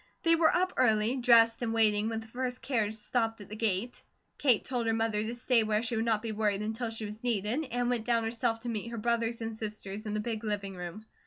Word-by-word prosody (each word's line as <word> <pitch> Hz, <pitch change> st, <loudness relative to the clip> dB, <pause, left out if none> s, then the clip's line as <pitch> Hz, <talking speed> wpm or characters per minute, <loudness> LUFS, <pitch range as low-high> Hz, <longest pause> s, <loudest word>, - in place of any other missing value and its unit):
They 330 Hz, -, +5 dB
were 325 Hz, -1 st, +4 dB
up 370 Hz, +1 st, +1 dB
early, 220 Hz, +1 st, +3 dB
dressed, 230 Hz, -2 st, +5 dB
and 230 Hz, -1 st, -1 dB
waiting 215 Hz, -1 st, +3 dB
when 225 Hz, -1 st, -3 dB
the 225 Hz, -, -12 dB
first 250 Hz, +2 st, -4 dB
carriage 220 Hz, -5 st, 0 dB
stopped 225 Hz, +1 st, -1 dB
at 205 Hz, -, -11 dB
the 215 Hz, -, -6 dB
gate. 220 Hz, +1 st, -1 dB, 0.4 s
Kate 250 Hz, -7 st, +3 dB
told 245 Hz, -3 st, -2 dB
her 225 Hz, -, +2 dB
mother 225 Hz, -2 st, 0 dB
to 225 Hz, +3 st, -3 dB
stay 240 Hz, -1 st, +3 dB
where 215 Hz, 0 st, +1 dB
she 235 Hz, 0 st, -1 dB
would 225 Hz, +1 st, 0 dB
not 220 Hz, -1 st, +1 dB
be 225 Hz, -, -3 dB
worried 210 Hz, -1 st, 0 dB
until 225 Hz, +2 st, -3 dB
she 225 Hz, -1 st, -4 dB
was 210 Hz, +2 st, -8 dB
needed, 235 Hz, +5 st, 0 dB
and 245 Hz, 0 st, -1 dB
went 240 Hz, -2 st, -1 dB
down 230 Hz, -1 st, +2 dB
herself 225 Hz, 0 st, -1 dB
to 240 Hz, -, -4 dB
meet 225 Hz, 0 st, -3 dB
her 235 Hz, -, -6 dB
brothers 235 Hz, +1 st, 0 dB
and 225 Hz, 0 st, -4 dB
sisters 215 Hz, -1 st, -6 dB
in 210 Hz, -, -2 dB
the -, -, 0 dB
big 220 Hz, 0 st, -3 dB
living 200 Hz, -3 st, -3 dB
room. 180 Hz, +4 st, -7 dB
225 Hz, 245 wpm, -30 LUFS, 215-240 Hz, 0.4 s, They